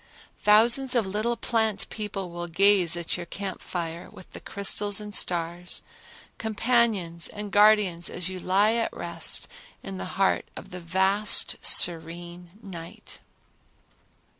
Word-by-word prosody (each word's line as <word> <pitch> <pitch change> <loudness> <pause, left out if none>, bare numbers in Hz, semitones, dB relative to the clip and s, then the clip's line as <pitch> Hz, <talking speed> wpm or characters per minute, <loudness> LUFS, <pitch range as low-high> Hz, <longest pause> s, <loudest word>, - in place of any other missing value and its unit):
Thousands 235 +5 +4
of 235 - +3
the 190 - -6
little 225 +4 -1
plant 220 -3 -1
people 200 -4 -5
will 175 0 -6
gaze 180 -1 +3
at 170 0 -3
your 175 -1 -7
camp 195 +1 -6
fire 170 -1 -5
with 185 - -15
the - - -8
crystals 200 +1 0
and 210 -1 -8
stars, 175 0 0 0.6
companions 220 -6 0
and 210 -1 -7
guardians 205 -5 +4
as 180 -1 -4
you 185 0 -5
lie 200 +5 +2
at 230 -1 -1
rest 170 -1 -3 0.4
in 95 - -7
the 90 - -4
heart 195 -1 +1
of 195 - -10
the 180 - -7
vast 190 +4 +2
serene 175 +1 +2
night. 170 -4 -10
190 Hz, 140 wpm, -26 LUFS, 175-210 Hz, 0.6 s, Thousands